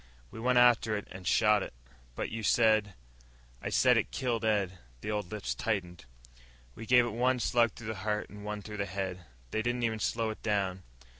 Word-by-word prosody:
We 110 Hz, -, -9 dB
went 125 Hz, +2 st, +2 dB
after 120 Hz, -3 st, +5 dB
it, 105 Hz, -, -7 dB
an' 95 Hz, -1 st, -9 dB
shot 105 Hz, +2 st, +4 dB
it." -, -, -6 dB, 0.4 s
"But -, -, -3 dB
you 115 Hz, 0 st, -4 dB
said 110 Hz, -2 st, +3 dB, 0.3 s
..." -, -, -28 dB
"I -, -, -3 dB
said -, -, +4 dB
it -, -, 0 dB
killed 120 Hz, -3 st, -2 dB
Ed." 100 Hz, -4 st, 0 dB, 0.2 s
The 105 Hz, -, -3 dB
old 105 Hz, -4 st, -3 dB
lips 105 Hz, -2 st, -3 dB
tightened. 90 Hz, -, -3 dB, 0.7 s
"We 110 Hz, -, -9 dB
gave 125 Hz, -1 st, +6 dB
it -, -, -2 dB
one 125 Hz, +2 st, +2 dB
slug 120 Hz, -2 st, +2 dB
through 120 Hz, -, -11 dB
the 110 Hz, -, -3 dB
heart 105 Hz, +1 st, -1 dB
and 105 Hz, 0 st, -10 dB
one 105 Hz, 0 st, -5 dB
through 105 Hz, 0 st, -7 dB
the 100 Hz, -1 st, -2 dB
head. 95 Hz, -2 st, -4 dB, 0.3 s
They 110 Hz, -, 0 dB
didn't 120 Hz, +1 st, -1 dB
even 110 Hz, -1 st, 0 dB
slow 115 Hz, +1 st, 0 dB
it 110 Hz, -, -9 dB
down." 100 Hz, -4 st, -1 dB
105 Hz, 210 wpm, -31 LUFS, 95-115 Hz, 0.7 s, gave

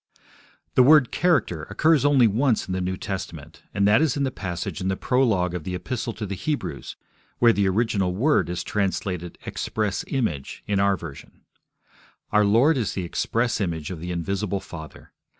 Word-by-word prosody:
The -, -, +5 dB
word 140 Hz, -1 st, +6 dB
'character' 115 Hz, -, +1 dB
occurs 150 Hz, +7 st, +3 dB
only 140 Hz, -4 st, +5 dB
once 115 Hz, +2 st, +2 dB
in 95 Hz, -, -3 dB
the 95 Hz, -, -1 dB
New 90 Hz, +1 st, -2 dB
Testament, 95 Hz, -1 st, -6 dB
and 100 Hz, 0 st, +2 dB
that 105 Hz, +7 st, +5 dB
is 150 Hz, -4 st, +1 dB
in 140 Hz, -, 0 dB
the 135 Hz, -, 0 dB
passage 90 Hz, -6 st, -5 dB
in 95 Hz, -, -2 dB
the 95 Hz, 0 st, 0 dB
prologue 110 Hz, -9 st, +1 dB
of 90 Hz, -3 st, -4 dB
the 90 Hz, +2 st, -4 dB
Epistle 120 Hz, +5 st, -3 dB
to 110 Hz, -, -5 dB
the 100 Hz, -, -4 dB
Hebrews, 145 Hz, -, -4 dB, 0.4 s
where 120 Hz, -1 st, +5 dB
the 100 Hz, -2 st, +2 dB
original 100 Hz, -3 st, 0 dB
word 140 Hz, -, +2 dB
is 90 Hz, 0 st, -3 dB
translated 95 Hz, -3 st, -2 dB
'express 105 Hz, -3 st, -2 dB
image' 85 Hz, -, -3 dB
in 100 Hz, -1 st, 0 dB
our 100 Hz, -1 st, +3 dB
version. 80 Hz, -6 st, -11 dB, 0.9 s
Our 105 Hz, 0 st, +4 dB
Lord 120 Hz, +10 st, +4 dB
is 115 Hz, -5 st, -1 dB
the 95 Hz, -, -3 dB
Express 115 Hz, +7 st, -1 dB
Image 85 Hz, -4 st, -3 dB
of 90 Hz, -, -6 dB
the 85 Hz, +2 st, -6 dB
Invisible 95 Hz, +3 st, -2 dB
Father. 80 Hz, -5 st, -11 dB
100 Hz, 180 wpm, -24 LUFS, 90-125 Hz, 0.9 s, word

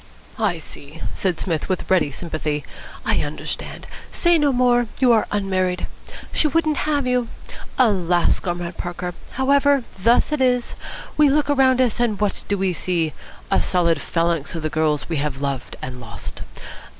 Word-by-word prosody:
"I 205 Hz, -6 st, +1 dB
see," 150 Hz, 0 st, -10 dB
said 185 Hz, -4 st, -1 dB
Psmith 165 Hz, -3 st, -2 dB
with 185 Hz, -, -1 dB
ready 170 Hz, -6 st, +4 dB
sympathy. 150 Hz, -1 st, -3 dB, 0.4 s
"I -, -, +2 dB
understand. -, -, -5 dB, 0.3 s
Say 345 Hz, -1 st, +3 dB
no 290 Hz, -1 st, +3 dB
more. 245 Hz, -1 st, +3 dB
You 255 Hz, -2 st, +4 dB
are 225 Hz, -2 st, +3 dB
unmarried. 185 Hz, -3 st, 0 dB, 0.5 s
She 310 Hz, -, +3 dB
wouldn't 305 Hz, 0 st, +1 dB
have 290 Hz, -3 st, +1 dB
you. 250 Hz, -1 st, +1 dB, 0.5 s
Alas, 180 Hz, -8 st, +3 dB
Comrade 175 Hz, -1 st, -4 dB
Parker! 175 Hz, 0 st, -4 dB, 0.2 s
However, 280 Hz, +1 st, +3 dB, 0.2 s
thus 235 Hz, +7 st, +4 dB
it 300 Hz, -3 st, 0 dB
is! 250 Hz, -2 st, +2 dB, 0.4 s
We 300 Hz, -1 st, +6 dB
look 290 Hz, +1 st, +2 dB
around 260 Hz, -2 st, +4 dB
us, 245 Hz, -3 st, +1 dB
and 230 Hz, -4 st, +1 dB
what 210 Hz, -2 st, 0 dB
do 200 Hz, -, 0 dB
we 190 Hz, -1 st, +1 dB
see? 165 Hz, -3 st, -1 dB, 0.4 s
A -, -, +4 dB
solid 170 Hz, -4 st, +2 dB
phalanx 165 Hz, -2 st, -1 dB
of 165 Hz, -, -4 dB
the 155 Hz, -, -1 dB
girls 155 Hz, -2 st, +1 dB
we 165 Hz, -, -2 dB
have 140 Hz, -2 st, -2 dB
loved 140 Hz, -3 st, -3 dB
and 125 Hz, -1 st, -6 dB
lost. 115 Hz, 0 st, -8 dB
185 Hz, 160 wpm, -22 LUFS, 165-255 Hz, 0.5 s, We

